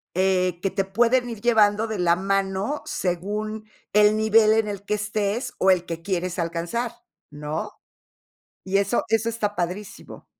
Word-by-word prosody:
Eh, 185 -1 +1
que 195 - 0
te 195 0 -1
pueden 240 +5 +2
ir 230 - -6
llevando 215 -2 +3
de 215 -4 -4
la 170 -1 +3
mano, 195 +7 -1
según 210 +4 -3 0.2
el 210 +1 +5
nivel 220 0 +5
en 220 -1 +2
el 200 -1 -6
que 210 - 0
estés, 210 +3 -2
o 190 - +3
el 180 -2 +3
que 165 -1 -5
quieres 185 -1 -2
alcanzar, 170 +8 -2 0.4
¿no? 150 +1 -5 0.8
Y 190 +1 0
eso 200 +4 +1
eso 225 0 +1
está 210 -2 -2
padrísimo. 180 +4 -5
205 Hz, 155 wpm, -24 LUFS, 185-220 Hz, 0.8 s, el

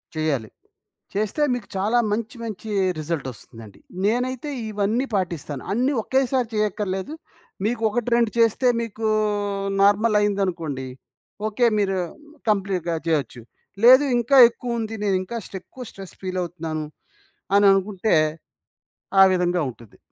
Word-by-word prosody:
చెయ్యాలి. 140 -8 -1 0.6
చేస్తే 215 +9 0
మీకు 240 -4 -5
చాలా 215 +5 +2
మంచి 225 +3 -2
మంచి 220 -1 -6 0.3
రిజల్ట్ 155 -3 -3
ఒస్తుందండి. 110 -2 -14 0.3
నేనైతే 250 +6 -1 0.2
ఇవన్నీ 210 +5 0
పాటిస్తాను. 165 -7 -3
అన్ని 255 +5 +1
ఒకేసారి 260 -2 +1
చేయక్కర్లేదు. 210 +2 -2 0.5
మీకు 230 0 -1
ఒకటి 240 +2 -2
రెండు 235 -2 +2
చేస్తే 230 +3 +3
మీకు 225 -1 -3 0.7
నార్మలయిందనుకోండి. 200 - +1 0.6
ఓకే. 220 +3 +1
మీరు 195 -1 +1 0.5
కంప్లీట్‌గా 190 -5 0
జెయొచ్చు. 140 -6 -1 0.4
లేదు 260 +4 +8
ఇంకా 245 +4 +3
ఎక్కువ 240 0 -5
ఉంది 225 0 -4
నేనింకా 190 +3 -1
స్టేక్ 190 -2 -9
ఎక్కువ 255 - -9
స్ట్రెస్ 195 -2 -11
ఫీలవుతున్నాను 170 -4 -4 0.7
అని 205 0 +5
అనుకుంటే 195 0 +1 1.1
ఆ - - +8
విధంగా 180 -1 +1
ఉంటది. 115 -2 -18
205 Hz, 115 wpm, -23 LUFS, 175-230 Hz, 1.1 s, లేదు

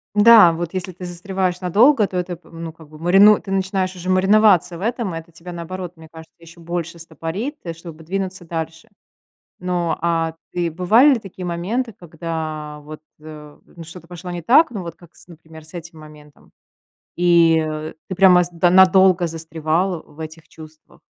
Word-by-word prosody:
Да. 210 -5 +7
Вот 170 +1 -5
если 185 0 -4
ты 180 +1 -10
застреваешь 180 +1 -3
надолго, 215 - +4
то 185 - -5
это, 180 0 -3
м, 165 0 -11
ну 165 -1 -6
как 160 -2 -17
бы 155 - -14
марину 195 +6 +5
ты 195 - -9
начинаешь 190 -1 -1
уже 180 0 -6
мариноваться 185 -2 +3
в - - -11
этом, 230 -3 -2
и - - -4
это 165 +1 -16
тебя, 170 +2 -11
наоборот, 175 +1 -7
мне 160 0 -14
кажется, 160 -1 -14
еще 170 0 -16
больше 170 0 -5
стопорит, 165 - -5
э, 170 - -5
чтобы 165 -1 -12
двинуться 190 +1 -4
дальше. 165 0 -6 0.7
Но, 180 -2 -2
а, 165 -1 0 0.2
ты 175 -1 -1
бывали 215 - +4
ли 245 - -1
такие 190 -3 -9
моменты, 205 +8 -3
когда 155 -3 -6
вот, 155 +1 -10 0.2
э, 150 -1 -12
ну 170 - -13
что-то 170 +1 -12
пошло 180 +1 -9
не 175 -1 -5
так, 265 - +4
ну, 210 -5 -5
вот 170 -1 -8
как 175 -2 -20
с, - - -19
например, 160 -2 -14
с 155 - -18
этим 165 -2 -10
моментом. 150 -1 -16 0.6
И, 170 -2 +4
э, 155 0 -4 0.2
ты 185 - -4
прямо 180 -1 +6
с, 175 - -7
да, 175 +1 +2
надолго 185 -1 +5
застревал 165 +2 -2
в 150 - -20
этих 160 0 -9
чувствах? 155 -1 -16
175 Hz, 185 wpm, -20 LUFS, 160-185 Hz, 0.7 s, Да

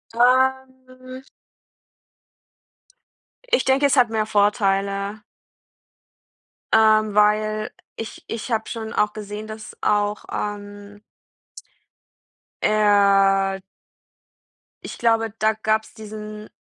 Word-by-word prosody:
Ähm 260 +1 0 2.3
ich - - +2
denke, 270 +2 +3
es 280 0 +2
hat 245 -3 +5
mehr 220 -1 -1
Vorteile. 200 0 0 1.5
Ähm, 215 -1 +4
weil 215 +1 +2 0.3
ich 225 - -8
ich 230 +2 -6
habe 220 -1 -1
schon 220 -2 -6
auch 210 0 +1
gesehen, 210 0 -7
dass 215 0 -10
auch, 205 0 0
ähm 205 0 -6 1.6
eher 195 -2 +3 1.2
Ich - - -8
glaube, 225 -2 +1
da 220 0 +2
gab 220 0 0
es - - -18
diesen 215 -1 -9
215 Hz, 90 wpm, -22 LUFS, 205-225 Hz, 2.3 s, hat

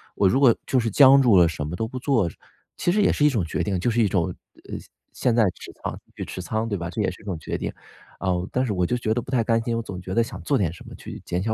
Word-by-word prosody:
我 100 - +3
如 130 - +2
果 130 -5 +6
就 130 - +2
是 115 -1 0
僵 135 +4 +7
住 115 -7 +5
了 85 - +7
什 75 -3 -4
么 80 - -4
都 110 - -2
不 130 +2 -6
做， 120 - +1 0.5
其 175 - +1
实 210 - +3
也 - - +4
是 150 - +2
一 - - +6
种 115 -10 0
决 85 - -2
定， 95 +1 -1
就 120 +7 +1
是 115 +1 +2
一 110 - +4
种， 90 -4 +1 0.4
呃， - - -4 0.4
现 120 -3 +1
在 115 - +5 0.4
仓 - - -2
持 - - -14 0.2
继 - - -9
续 90 - -5
仓 110 +4 -2
对 105 -3 -2
吧， 85 -1 -4
这 85 - -3
也 - - +1
是 - - -13
一 - - -17
种 95 -5 -3
决 - - -4
定。 - - -3 0.5
啊， 95 - 0 0.2
但 130 - +1
是 115 - -2
我 90 -2 +1
就 125 - 0
觉 110 -2 0
得 120 - 0
不 130 - -10
太 120 -3 +2
甘 115 +1 +2
心， 115 0 -1
我 115 - -1
总 95 -4 -7
觉 95 +1 -6
得 115 - +4
想 115 - -8
做 145 - +1
点 90 -8 0
什 85 - -13
么 - - -10
去 - - -9
减 90 - -2
小 110 - 0
110 Hz, 340 characters per minute, -24 LUFS, 90-125 Hz, 0.5 s, 僵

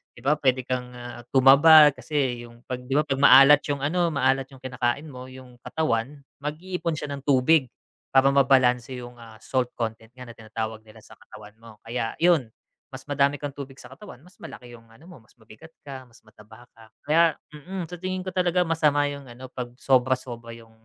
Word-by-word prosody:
'di 120 - -16
ba? 150 +2 +3
Pwede 130 -2 +1
kang, 125 -1 -3
ah, 120 0 -9
tumaba, 145 +3 +7
kasi 135 -6 -3
yung 120 +1 -19
pag, 125 -1 -5
'di 135 +2 -4
ba? 150 - +3
Pag 135 -1 -2
maalat 140 +1 +8
yung, 140 -1 -2
ano, 175 +3 +1
maalat 135 0 +1
yung 135 -2 -17
kinakain 125 +3 -2
mo 130 0 -10
yung 130 -2 -14
katawan, 145 -3 -2 0.2
mag-iipon 165 +2 -4
siya 150 -1 -6
ng 140 - -7
tubig 135 +1 +3 0.5
para 135 +1 +6
mabalanse 130 -2 +2
yung, 120 0 -11
ah, 110 -1 -14
salt 125 +1 -2
content 110 -1 -5
nga 125 - -10
na 115 - -10
tinatawag 110 0 -6
nila 110 0 -18
sa - - -16
katawan 105 -1 -14
mo, 115 -2 -15
kaya 115 -1 -4
yun 165 -7 +2 0.5
mas - - -10
madami 140 +1 +2
kang 145 0 -6
tubig 135 -1 -10
sa 125 -1 -14
katawan 140 -2 -13
mas 180 - -21
malaki 120 -1 -11
yung, 115 -1 -16
ano 115 +7 -20
mo, 180 -6 -14
mas 110 - -27
mabigat 110 +7 -16 0.2
ka, 130 -2 -9
mas 115 -1 -23
mataba 110 +2 -17
ka 115 -1 -18 0.2
kaya, 160 +1 +3 0.2
mm, 175 +3 -8
sa 175 - -8
tingin 185 0 -4
ko 185 - -6
talaga 180 -1 +1
masama 155 -3 +1
yung, 140 -2 -9
ano, 125 +1 -12
pag 125 -1 -6
sobra 130 0 +2
sobra 115 -2 -10
yung 115 -1 -16
130 Hz, 200 wpm, -24 LUFS, 120-150 Hz, 0.5 s, maalat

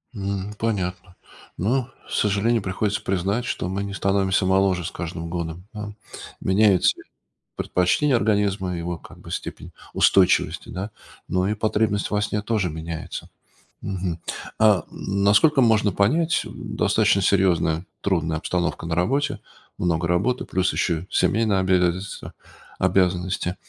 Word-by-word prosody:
М, 100 0 -3
понятно. 90 -4 -3 0.4
Но, 120 +6 0 0.2
к - - -14
сожалению, 105 +3 +2
приходится 100 +2 -1
признать, 95 +6 -1
что 90 - -2
мы 95 +2 -2
не 100 0 -5
становимся 95 -1 +1
моложе 95 -2 +2
с - - -4
каждым 85 -1 -5
годом, 85 +1 -4
ам. 105 -1 -6 0.4
Меняют 95 -1 +3
се - - +3 0.5
предпочтения 125 +11 +2
организма, 100 -4 +1
его, 85 0 -3
как - - -15
бы, - - -12
степень - - -6 0.2
устойчивости, 95 -2 +3
да, 95 +3 -4 0.4
но 90 +1 +1
и 105 - +1
потребность 105 -1 0
во 105 0 0
сне 105 0 -1
тоже 105 -4 0
меняется. 80 +1 -6 0.5
Мгм. 90 -3 -3 0.4
А, 105 -6 +5
насколько 105 +9 +3
можно 110 -3 +4
понять, 155 - +2
м, - - -8
достаточно 100 - +3
серьезная, 90 -3 +2 0.2
трудная 80 -5 0
обстановка 85 +1 -2
на 80 0 -1
работе, 140 - 0 0.4
много 85 -1 0
работы, 100 +9 +1
плюс 95 -1 0
еще 85 0 -1
семейные 110 -2 +2
обязательства, 95 0 0 0.5
обязанности, 90 -1 +1
95 Hz, 130 wpm, -23 LUFS, 90-105 Hz, 0.5 s, А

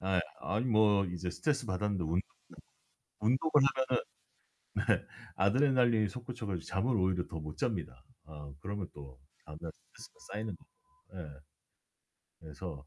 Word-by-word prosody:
아이 95 -1 +2 0.2
아니 110 +5 0
뭐 105 -4 +5
이제 90 0 -3
스트레스 140 - 0
받았는데 95 -1 0
운동은 85 +3 +2 1.0
운동을 130 +9 +2 1.3
하면은 - - +2
네. - - -30 0.3
아드레날린이 120 +1 +4
솟구쳐 120 -2 -6
가지고 90 -4 -2
잠을 110 +6 +1
오히려 90 -2 +2
더 80 - -6
못 75 0 -6
잡니다. 85 - -2 0.2
어 75 -2 -9
그러면 100 +1 -3
또 70 -3 -11 0.3
다음날 80 +2 -6
스트레스가 - - -15
쌓이는 - - -3
거죠. - - -24 0.4
예. 75 -4 -7 1.0
그래서 75 -2 -7
95 Hz, 320 characters per minute, -33 LUFS, 80-115 Hz, 1.3 s, 뭐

